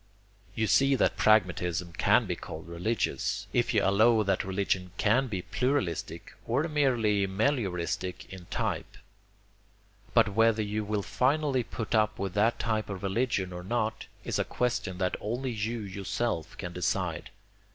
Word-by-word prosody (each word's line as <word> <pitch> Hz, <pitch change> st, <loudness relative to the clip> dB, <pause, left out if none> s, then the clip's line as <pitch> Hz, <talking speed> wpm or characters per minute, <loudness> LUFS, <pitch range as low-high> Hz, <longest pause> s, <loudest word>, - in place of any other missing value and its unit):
You 110 Hz, -, +1 dB
see 135 Hz, +5 st, +4 dB
that -, -, +2 dB
pragmatism 90 Hz, -4 st, +2 dB
can -, -, +3 dB
be -, -, -2 dB
called 80 Hz, +1 st, -8 dB
religious, 95 Hz, +1 st, -1 dB
if 120 Hz, 0 st, +2 dB
you 105 Hz, -4 st, +2 dB
allow 110 Hz, +3 st, +4 dB
that 95 Hz, -2 st, +1 dB
religion 95 Hz, -1 st, -1 dB
can 120 Hz, +6 st, +3 dB
be 95 Hz, -6 st, -4 dB
pluralistic 110 Hz, -, -2 dB
or 125 Hz, +6 st, +1 dB
merely 120 Hz, -10 st, +2 dB
melioristic 95 Hz, -, -1 dB
in 90 Hz, -2 st, -10 dB
type. -, -, -3 dB, 1.2 s
But 115 Hz, -3 st, +5 dB
whether 115 Hz, 0 st, +3 dB
you 105 Hz, +1 st, -2 dB
will 105 Hz, -1 st, -2 dB
finally 135 Hz, +2 st, +1 dB
put 115 Hz, -1 st, -5 dB
up 110 Hz, -1 st, +2 dB
with 95 Hz, -2 st, -3 dB
that 110 Hz, +4 st, +2 dB
type 110 Hz, -3 st, -1 dB
of 95 Hz, -2 st, -6 dB
religion 95 Hz, -2 st, 0 dB
or 90 Hz, 0 st, -6 dB
not 110 Hz, +2 st, -2 dB, 0.2 s
is -, -, -2 dB
a -, -, +3 dB
question 120 Hz, -7 st, -2 dB
that 90 Hz, -1 st, 0 dB
only 125 Hz, +4 st, -2 dB
you 115 Hz, +1 st, -2 dB
yourself 100 Hz, -2 st, -3 dB
can 90 Hz, -2 st, -6 dB
decide. 90 Hz, -1 st, -2 dB
105 Hz, 150 wpm, -29 LUFS, 95-120 Hz, 1.2 s, But